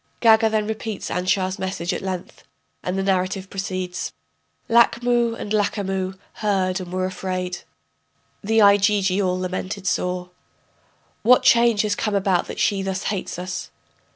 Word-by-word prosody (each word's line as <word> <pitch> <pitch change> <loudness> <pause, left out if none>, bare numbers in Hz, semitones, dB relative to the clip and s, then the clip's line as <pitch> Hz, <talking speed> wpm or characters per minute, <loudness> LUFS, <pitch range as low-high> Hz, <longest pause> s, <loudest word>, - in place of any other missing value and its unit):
[Gaga 225 -1 +5
then 215 -1 0
repeats 220 -1 -4
Anshar's 185 +1 0
message 185 -2 -2
at - - -3
length, 185 -2 -6 0.4
and 180 +1 -3
the 195 - 0
narrative 190 0 -1
proceeds.] 185 -2 -4 0.5
Lachmu 235 0 +3
and 205 - -6
Lachamu 195 -2 -1 0.2
heard 190 -3 +1
and 180 -1 -8
were 185 0 -1
afraid, 185 -1 -3 0.8
The 220 +2 +3
Igigi 200 -1 +4
all 185 -1 0
lamented 185 +2 -4
sore: 180 -1 -1 0.9
What 250 +3 +5
change 235 -3 +5
has 210 -1 +1
come 210 0 -1
about 190 -2 +1
that - - -7
she 200 -1 +2
thus 190 0 -3
hates 190 -3 -4
us? 180 0 -5
195 Hz, 140 wpm, -22 LUFS, 185-210 Hz, 0.9 s, Gaga